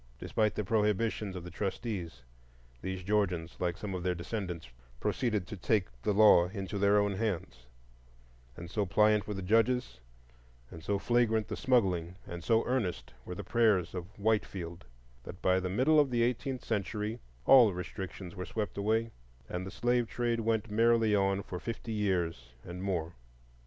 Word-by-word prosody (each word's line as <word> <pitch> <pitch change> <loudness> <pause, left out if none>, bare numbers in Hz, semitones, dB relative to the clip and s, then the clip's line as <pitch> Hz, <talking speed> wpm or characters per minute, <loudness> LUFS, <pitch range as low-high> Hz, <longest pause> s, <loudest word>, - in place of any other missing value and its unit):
Despite 105 - 0
the 105 - -1
prohibitions 105 -1 0
of 90 - -6
the 90 - -8
trustees, 95 - -4 0.6
these 95 -1 -4
Georgians, 90 -5 0
like 85 -2 -1
some 105 -2 -5
of 90 - -3
their 90 0 0
descendants, 90 - -5 0.3
proceeded 110 -7 0
to 105 - -7
take 100 +1 +1
the 105 - +1
law 100 -4 +6
into 100 +1 -5
their 100 +1 +4
own 100 -1 +2
hands; 95 - -3 0.9
and 85 - -7
so 105 +5 -1
pliant 105 +1 +3
were 105 - -3
the 95 - -5
judges, 115 - +2 0.7
and 80 - -10
so 100 +1 0
flagrant 110 -1 +2
the 105 - -2
smuggling, 95 -10 +1
and 85 -1 -7
so 115 -1 +3
earnest 90 - -2
were 90 - -6
the 100 - -6
prayers 105 -4 +2
of 90 -2 -5
Whitefield, 95 - -1 0.4
that 90 - -9
by 95 0 +3
the 90 0 -3
middle 130 +11 +4
of 145 -2 +4
the 120 -2 +2
eighteenth 125 +1 -2
century 105 +1 -2 0.3
all 125 -6 +8
restrictions 90 +1 -6
were 90 - -4
swept 105 -2 -3
away, 110 +3 +1 0.4
and 90 +1 -4
the - - -4
slave 120 +2 +1
trade 120 -1 -1
went 110 -1 0
merrily 115 0 +3
on 100 -1 +2
for 90 - -6
fifty 115 +1 -5
years 85 - -1
and 90 +1 -7
more. 90 -4 -2
100 Hz, 165 wpm, -31 LUFS, 90-110 Hz, 0.9 s, all